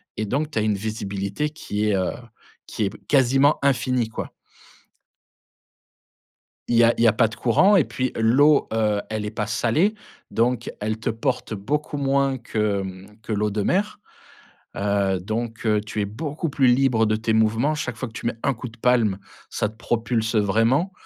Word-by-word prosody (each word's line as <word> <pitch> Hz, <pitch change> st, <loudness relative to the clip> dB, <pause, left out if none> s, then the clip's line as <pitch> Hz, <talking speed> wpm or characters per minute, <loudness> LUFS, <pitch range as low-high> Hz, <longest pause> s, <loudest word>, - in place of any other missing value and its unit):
et 110 Hz, -, -2 dB
donc 145 Hz, +8 st, -2 dB
tu 115 Hz, -, -1 dB
as -, -, +1 dB
une 105 Hz, -1 st, +1 dB
visibilité 100 Hz, +4 st, -3 dB
qui 105 Hz, -8 st, -3 dB
est, 105 Hz, -, +2 dB
heu, 95 Hz, -1 st, 0 dB, 0.6 s
qui 105 Hz, -, -2 dB
est 100 Hz, -, -7 dB
quasiment 135 Hz, +1 st, +4 dB
infinie, 125 Hz, -3 st, +1 dB
quoi. 110 Hz, -, -6 dB, 2.4 s
Il 120 Hz, -, +1 dB
y 120 Hz, -, +6 dB
a 115 Hz, 0 st, +5 dB
il -, -, +2 dB
y -, -, +6 dB
a 110 Hz, -, +5 dB
pas 115 Hz, +1 st, +3 dB
de 110 Hz, -, -9 dB
courant 190 Hz, -, +4 dB
et 180 Hz, -, +5 dB
puis 130 Hz, -1 st, -2 dB
l'eau, 140 Hz, +7 st, +4 dB
heu, 105 Hz, -2 st, +1 dB
elle 110 Hz, -1 st, -2 dB
est -, -, -2 dB
pas 105 Hz, -1 st, -2 dB
salée, 120 Hz, -, +1 dB, 0.4 s
donc 120 Hz, 0 st, 0 dB
elle 110 Hz, +1 st, -2 dB
te 110 Hz, -, -2 dB
porte 120 Hz, +1 st, -2 dB
beaucoup 145 Hz, +9 st, -3 dB
moins 135 Hz, -1 st, +1 dB
que, 105 Hz, -4 st, -1 dB
mmh, 95 Hz, +2 st, -9 dB
que 115 Hz, -, -4 dB
l'eau 105 Hz, 0 st, 0 dB
de 105 Hz, +1 st, -1 dB
mer. 205 Hz, -, 0 dB, 0.8 s
Heu, 100 Hz, -1 st, +1 dB
donc 115 Hz, +5 st, -4 dB
heu, 105 Hz, -1 st, +3 dB
tu 105 Hz, 0 st, -5 dB
es -, -, 0 dB
beaucoup 150 Hz, -, -4 dB
plus 135 Hz, -2 st, +2 dB
libre 125 Hz, -3 st, +3 dB
de 110 Hz, -, +1 dB
tes 110 Hz, +1 st, -1 dB
mouvements. 110 Hz, +7 st, +2 dB
Chaque 125 Hz, -6 st, -4 dB
fois 125 Hz, -, -4 dB
que -, -, -16 dB
tu -, -, -6 dB
mets 115 Hz, -, -1 dB
1 140 Hz, -, +2 dB
coup 125 Hz, +2 st, -7 dB
de 115 Hz, -, -16 dB
palme, 115 Hz, -5 st, +2 dB, 0.3 s
ça 105 Hz, -, -1 dB
te 110 Hz, -, -21 dB
propulse 115 Hz, 0 st, -1 dB
vraiment. 115 Hz, -, +2 dB
115 Hz, 190 wpm, -23 LUFS, 105-130 Hz, 2.4 s, y